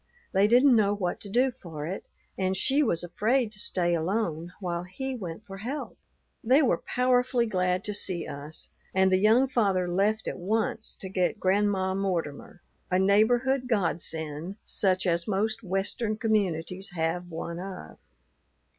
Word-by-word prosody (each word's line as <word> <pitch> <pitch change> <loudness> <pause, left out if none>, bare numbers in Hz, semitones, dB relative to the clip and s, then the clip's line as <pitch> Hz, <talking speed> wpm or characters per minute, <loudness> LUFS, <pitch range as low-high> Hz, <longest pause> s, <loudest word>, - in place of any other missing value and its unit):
They 195 +1 +4
didn't 250 +3 +6
know 205 -2 +3
what 180 -3 -2
to 200 - -7
do 250 +5 +3
for 165 -11 -8
it; 185 +5 -5 0.3
and 190 0 -1
she 275 +8 +2
was 175 - +2
afraid 220 +7 0
to 210 - -8
stay 175 -4 +1
alone 170 -1 -1
while 175 -3 -2
he 225 +10 -5
went 195 -3 -7
for 195 -2 -9
help. 260 +8 -5 0.5
They 265 +6 +5
were 255 - +2
powerfully 250 -1 +1
glad 185 -3 0
to 210 - -1
see 185 -4 -1
us, 145 +2 -8 0.2
and 190 0 +4
the 185 - +4
young 225 +6 +5
father 195 -8 +1
left 205 +5 +1
at - - -4
once 220 +3 -1
to 190 - -6
get 185 +2 0
Grandma 190 -1 +1
Mortimer, 180 -4 -3 0.3
a 185 - +2
neighborhood 240 +7 +3
godsend 165 -5 -1
such 190 -1 +1
as 170 -1 +1
most 215 +2 0
Western 205 +3 -1
communities 190 -4 -1
have 170 +2 -1
one 170 +1 -5
of. 185 - -8
195 Hz, 155 wpm, -27 LUFS, 175-220 Hz, 0.5 s, didn't